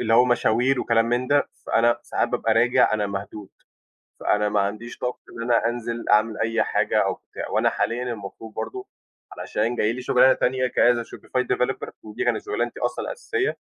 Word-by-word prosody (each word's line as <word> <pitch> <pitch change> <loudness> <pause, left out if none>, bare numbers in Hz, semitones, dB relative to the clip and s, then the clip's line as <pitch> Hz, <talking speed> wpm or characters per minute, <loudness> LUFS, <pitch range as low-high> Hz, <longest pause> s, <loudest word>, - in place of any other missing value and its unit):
اللي 115 -1 +2
هو 120 +2 +7
مشاوير 125 +1 +2
وكلام 115 -1 +2
من 120 +2 0
ده، 145 0 +3 0.2
فأنا 120 +1 +3
ساعات - - -1
بابقى 110 -1 0
راجع 125 +1 +4
أنا 105 -1 +1
مهدود، 100 0 -6 0.7
فأنا 105 0 +1
ما 105 -1 +1
عنديش 110 +4 -3
طاقة 125 0 -3 0.2
إن - - -5
أنا 115 -1 +2
أنزل 120 0 -4
أعمل 110 +1 +3
أي 115 0 +1
حاجة - - +1
أوبتاع، - - -5
وأنا - - +2
حاليّا 120 +2 -1
المفروض 110 -2 -7
برضه 385 0 -5 0.5
علشان 115 +3 -2
جاي 110 -1 +1
لي 130 - -6
شُغلانة 125 +1 +5
تانية 130 0 0
كas 120 0 +4
a 115 - -5
shopify 125 - -3
developer 125 +1 -2
ودي 105 -1 -5
كانت - - 0
شُغلانتي 415 0 -2
أصلًا - - -2
الأساسية، 480 -5 -2
120 Hz, 180 wpm, -24 LUFS, 110-125 Hz, 0.7 s, هو